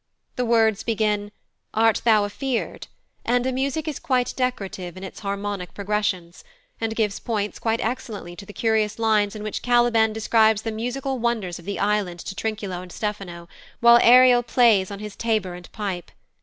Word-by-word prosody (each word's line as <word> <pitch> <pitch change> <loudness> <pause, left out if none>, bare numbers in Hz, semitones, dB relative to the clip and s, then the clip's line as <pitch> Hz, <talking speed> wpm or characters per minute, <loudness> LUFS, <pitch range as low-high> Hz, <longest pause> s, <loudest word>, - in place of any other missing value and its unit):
The 250 - -1
words 225 -3 +3
begin, 210 -2 -1 0.4
"Art 225 0 +3
thou 220 -3 +5
afeared?" 245 +4 -3 0.4
and 245 +1 +1
the 260 - +1
music 275 +4 -2
is 300 - -3
quite 250 -2 0
decorative 195 -8 -3
in 185 - -8
its 190 - -8
harmonic 200 -2 -4
progressions, 200 -4 -2 0.4
and 225 -1 -2
gives 210 -3 0
points 210 -3 -3
quite 225 0 0
excellently 220 -7 -4
to 200 - -9
the - - -8
curious 220 -1 0
lines 215 -2 +2
in 210 - -6
which 215 - -4
Caliban 240 -2 +3
describes 220 0 +3
the 225 - -2
musical 250 +4 -3
wonders 225 -7 -1
of 170 - -14
the 200 0 -3
island 200 -4 0
to - - -6
Trinculo 200 -3 -4
and 180 -1 -11
Stephano, 195 -5 -5 0.3
while 235 0 +7
Ariel 250 0 +7
plays 230 -6 +3
on 200 - -6
his 210 0 -8
tabor 215 -6 -1
and 180 0 -11
pipe. 195 -5 -4
215 Hz, 170 wpm, -23 LUFS, 200-235 Hz, 0.4 s, while